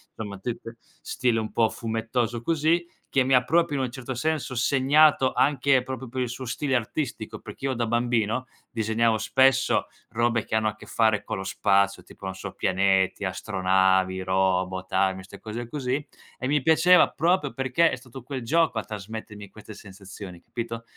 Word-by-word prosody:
insomma 105 -3 -6
tutte 115 +1 -6 0.2
stile 125 -3 0
un 110 - -4
po' 115 -1 +3
fumettoso 115 +1 -2
così, 165 +4 +1 0.2
che 135 - +3
mi 135 - +1
ha 125 -1 +5
proprio 165 -1 +2
in 130 - 0
un 120 - -6
certo 130 0 -6
senso 135 -1 -2
segnato 135 +2 +4
anche 140 -2 +3
proprio 130 -1 -6
per 130 - -5
il 125 - 0
suo 125 +2 -6
stile 135 +3 -1
artistico, 120 -1 -3
perché 105 +5 -9
io 130 - 0
da 120 -1 -1
bambino 120 +1 0 0.2
disegnavo 110 0 +1
spesso 135 +4 +3 0.2
robe 115 -1 +1
che - - -9
hanno 110 0 +2
a 105 - -2
che - - -14
fare 110 -2 +1
con - - -4
lo 95 - -5
spazio, 100 0 +1
tipo, 95 - -13
non 95 0 -4
so, 95 0 -7
pianeti, 95 +1 +1
astronavi, 95 -1 +1
robot, 95 0 0
armi, 95 0 +1
ste 95 - -12
cose 115 +2 -6
così, 140 0 -2 0.3
e 130 - -3
mi 145 0 +2
piaceva 165 +4 +5
proprio 170 -3 +1
perché 135 +5 +2
è - - -2
stato 130 0 -11
quel 130 +1 -6
gioco 155 -2 +2
a - - -4
trasmettermi 105 0 -8
queste 110 +1 -12
sensazioni, 95 -2 -11
capito? 115 -1 -6
115 Hz, 175 wpm, -25 LUFS, 100-130 Hz, 0.3 s, ha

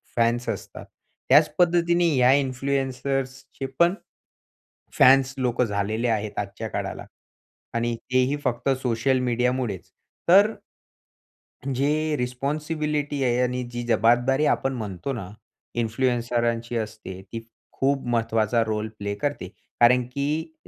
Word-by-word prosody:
Fans 120 0 +1
असतात. - - -6 0.4
त्याच 145 +4 +6
पद्धतीने 175 0 +3
या 125 +1 +5
इन्फ्लुएन्सर्सचे 135 0 -2
पण, 170 +1 +5 1.1
फॅन्स 130 0 +6
लोकं 125 -1 +1
झालेले 105 +3 -1
आहेत 110 -2 -2
आजच्या 100 -1 -5
काळाला - - -4 0.7
आणि 120 0 0 0.2
तेही 130 +3 +2
फक्त 125 0 -1
सोशल 125 +2 +1
मीडियामुळेच. 125 -6 -1 0.4
तर 205 +5 +6 1.2
जे 150 +3 +1
रिस्पॉन्सिबिलिटी 145 +3 -2
आहे 125 0 +2
आणि 125 0 -1
जी 120 0 -3
जबाबदारी 120 +5 +3
आपण 135 -2 +1
म्हणतो 105 +2 -4
ना 95 -6 -6 0.5
इन्फ्लुएन्सरांची 120 0 -1
असते 110 -4 -6
ती 115 - -4 0.3
खूप 135 0 0
महत्वाचा 115 -1 +1
रोल 110 -1 -2
प्ले 100 0 -3
करते. 145 -6 -3 0.3
कारण 125 +1 +6
की 155 +3 -2
125 Hz, 110 wpm, -24 LUFS, 115-140 Hz, 1.2 s, त्याच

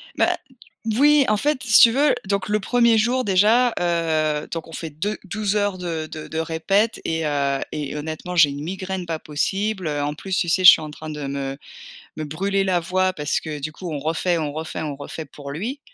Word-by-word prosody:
Bah, - - +2
d 260 - -23 0.4
voui 290 +1 +5
en 215 - +3
fait 285 +5 0
si 225 -2 +6
tu 230 - +8
veux 280 +4 +3
donc 200 -1 -1
le 210 0 0
1er 235 0 +3
jour 245 +4 +1
déjà, 220 +5 +4
heu, 160 -3 0
donc 165 -1 -5
on - - -11
fait 160 0 -5
deux 195 +9 -3
douze 205 +1 -2
heures 205 -2 0
de 165 -3 -4
de 155 -1 -8
de 160 - -5
répète 195 +7 0
et 160 -1 -1
heu 140 -2 0
et 150 -1 -4
honnêtement 160 +4 -5
j'ai 150 -4 +7
une 145 +1 -6
migraine 185 +1 -4
pas 165 -1 -3
possible, 190 +5 -2
heu. 145 -1 -1
En 145 +1 -1
plus, 190 +5 -4
tu 175 - 0
sais? 185 +2 +1
Je 180 - +12
suis - - +2
en 155 - -6
train 155 +1 -9
de 150 -2 -5
me 135 0 -4 0.6
me 155 - -3
brûler 195 +6 -1
la 185 -2 +1
voix 185 +2 0
parce 150 -4 -1
que 150 -2 -6
du 155 +3 -4
coup 175 +2 -7
on 145 - -3
refait 165 +3 0
on 150 -2 -2
refait 160 +1 -5
on 150 -3 -4
refait 145 +3 -7
pour 140 0 -10
lui. 230 - -4
170 Hz, 225 wpm, -22 LUFS, 155-205 Hz, 0.6 s, Je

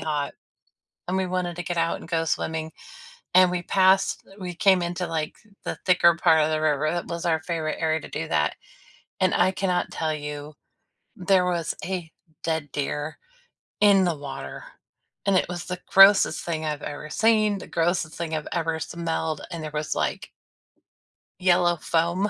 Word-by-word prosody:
hot, 150 -2 -2 0.7
and 185 +1 0
we 190 - +1
wanted 180 -1 -2
to 175 - -3
get 175 - -3
out 165 0 0
and - - -11
go 165 -1 +1
swimming, 160 +1 -2 0.6
and 185 -1 +7
we 175 -1 -2
passed 190 +1 +3 0.2
we 180 -1 -5
came 190 0 +4
into, 175 +1 -3
like, 155 -2 -3 0.3
the - - -2
thicker 170 -2 +5
part 160 -2 +4
of 155 - 0
the 155 - 0
river- 155 0 +1
that 175 0 -3
was 170 +1 -4
our 160 -2 +1
favorite 160 -2 -3
area 160 0 +1
to - - -10
do - - -4
that- 75 0 +1 0.7
and 185 - +3
I 180 +1 +4
cannot 180 -2 -1
tell 155 -1 -1
you 150 0 -6 0.6
there 185 -1 +3
was 170 -2 -1
a 180 -4 -4 0.3
dead 160 -4 -2
deer 150 +2 -3 0.6
in 200 -2 +6
the 175 -3 0
water, 135 - -7 0.6
and 200 -1 +3
it - - +1
was 175 -1 -5
the 180 0 -5
grossest 195 +1 +6
thing 160 -2 -2
I've 150 -1 -3
ever 150 +1 -6
seen, 215 +1 +3
the - - -9
grossest 165 -1 0
thing 165 -2 -3
I've 155 - -4
ever 165 -2 -1
smelled, 160 -2 -3
and 165 -2 -5
there 155 - -5
was, 150 0 -2
like - - -2 1.1
yellow 175 -2 +3
foam. 170 +6 0
170 Hz, 175 wpm, -25 LUFS, 155-180 Hz, 1.1 s, and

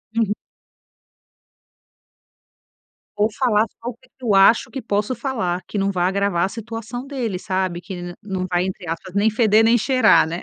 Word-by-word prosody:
Uhum. 220 -3 +2 2.8
Ou 210 +1 +2
falar 220 -3 +2
só 235 - -5
o - - -6
que 255 +2 -26
que 255 - -13
eu 215 - +2
acho 195 +4 +5
que 265 - -5
posso 210 +2 -1
falar, 205 -10 -2
que 210 - -5
não 195 0 +1
vai 180 -2 +1
agravar 195 -2 +1
a - - -3
situação 230 +3 -6
dele, 245 -9 -3
sabe, 185 -2 -2
que 185 +2 -8
el 175 0 -7
não 190 -2 -3
vai, 175 +1 +1
entre 185 -2 -6
aspas, 180 +2 -5
nem 205 +2 +3
feder 220 0 +4
nem 230 +2 +5
cheirar, 255 -1 +4
né. 170 +2 -4
205 Hz, 180 wpm, -21 LUFS, 185-230 Hz, 2.8 s, acho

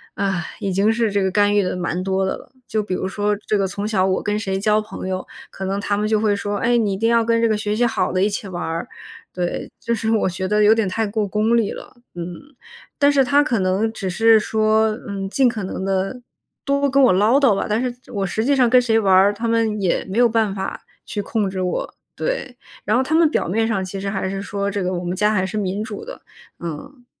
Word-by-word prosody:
啊， 195 -3 -1 0.2
已 195 - -2
经 200 +4 +3
是 225 -2 0
这 200 0 +1
个 190 - +1
干 205 +1 +3
预 205 - +4
得 185 - -2
蛮 180 0 -2
多 190 0 0
的 190 - -1
了。 - - -16 0.2
就 215 - 0
比 200 -3 -4
如 190 - -2
说 205 +1 0
这 215 - +1
个 195 -1 +1
从 200 +2 -4
小 195 -4 +1
我 190 -1 0
跟 210 0 0
谁 195 -2 -2
交 215 +1 +2
朋 215 -3 -7
友， 185 0 -3 0.3
可 190 - -6
能 195 +1 -1
他 205 0 -1
们 210 +1 0
就 215 -1 +2
会 210 -2 +2
说： 205 0 -3
“哎， 240 +3 +2
你 210 -4 +1
一 - - -3
定 225 +2 +1
要 230 -1 +4
跟 230 0 +2
这 230 - +4
个 215 - +1
学 210 0 -2
习 240 +2 +2
好 220 -6 0
的 185 +1 +1
一 - - +4
起 200 0 -4
玩 175 -1 -5
儿”， 165 +1 -3 0.4
对， 175 -1 -3
就 235 - -2
是 220 0 -1
我 220 -3 +2
觉 185 +1 -3
得 210 +1 +2
有 215 +1 +7
点 220 -4 0
太 220 +4 -1
过 210 0 -1
功 215 +4 +1
利 225 -3 +1
了。 - - -10 0.2
嗯， 170 -1 -4 0.7
但 285 0 +4
是 275 -1 +4
他 285 +3 +3
可 235 -7 0
能 195 +4 0
只 195 -4 -4
是 225 +4 +5
说， 220 0 +2 0.2
嗯， 195 -1 -4
尽 265 +4 +3
可 220 -4 -2
能 190 0 -4
地 195 +6 -1 0.4
多 280 0 +1
跟 275 +1 +3
我 245 - +5
唠 215 +8 +4
叨 250 -8 +4
吧， - - -2
但 215 - +1
是 250 -1 -2 0.2
我 200 -3 -2
实 220 +5 -1
际 280 +2 +2
上 255 -2 +4
跟 250 +1 +5
谁 225 -2 +2
玩 195 -3 +3
儿， 195 +2 +6
他 225 +3 -4
们 225 -2 +1
也 185 -3 0
没 195 +3 -5
有 240 0 +6
办 220 -3 +1
法 190 0 -4 0.2
去 205 - -3
控 210 0 -1
制 190 -1 -4
我。 180 - -2 0.2
对， 275 - -3 0.3
然 215 +3 +2
后 260 - +2
他 300 +4 -3
们 325 -1 +5
表 - - -1
面 225 +5 +1
上 200 -4 -1
其 190 +1 -6
实 195 - -2
还 190 -1 -2
是 195 0 -4
说： 200 0 -3
“这 200 -1 -2
个 180 - -1
我 175 - -3
们 180 +1 -2
家 210 +2 +2
还 190 -2 +1
是 200 - -6
民 200 +1 -2
主 400 - -7
的”， - - -10 0.4
嗯。 245 - -8
210 Hz, 280 characters per minute, -21 LUFS, 190-225 Hz, 0.7 s, 有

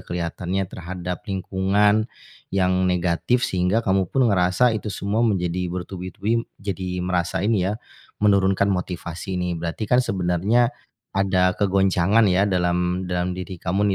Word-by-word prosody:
kelihatannya, 90 +2 -3
terhadap 90 0 -5
lingkungan 100 +3 +1 0.4
yang 95 -1 +1
negatif, 90 +7 +1
sehingga 95 +5 +1
kamu 95 -2 +1
pun 130 -1 +2
ngerasa 95 +6 +3
itu 110 -1 -3
semua 100 +2 -2
menjadi 90 -5 0
bertubi-tubi, 95 +5 -3
jadi 95 -2 -4
merasa 90 0 -1
ini 100 -4 +2
ya, 105 - -2 0.5
menurunkan 100 0 +3
motivasi 90 0 -4
nih. 90 -1 -1
Berarti 85 +6 -3
kan 125 +4 +3
sebenarnya 100 +4 +1 0.4
ada 90 -2 +2
kegoncangan 95 +1 +3
ya 95 +1 +3
dalam 90 -1 0
dalam 90 0 -1
diri 90 0 -6
kamu 95 +4 0
95 Hz, 130 wpm, -23 LUFS, 90-100 Hz, 0.5 s, ngerasa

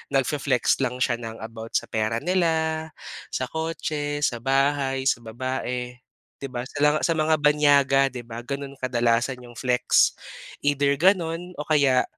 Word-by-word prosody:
nagfe-flex 135 -1 +1
lang 125 -2 -1
siya 120 -2 +1
ng 115 -1 -7
about 115 0 -8
sa - - -1
pera 110 +3 -1
nila, 160 -3 +1 0.4
sa - - -3
kotse, 150 -2 -3
sa 120 - +1
bahay, 135 +1 +1
sa 135 -3 +2
babae. 125 +1 -4 0.5
'Di 140 - -5
ba? 125 -2 -5
Sa 130 - -10
la 150 +1 +5
sa - - +2
mga 160 -1 +2
banyaga 145 -2 +4
'di 125 -2 -7
ba 115 0 -8
ganun 140 0 -5
kadalasan 120 0 0
yung 120 -1 -13
flex 125 -1 +3 0.5
either 145 0 +2
ganun 175 -1 +2
o 150 - -5
kaya, 140 -4 +4
135 Hz, 155 wpm, -24 LUFS, 125-150 Hz, 0.5 s, la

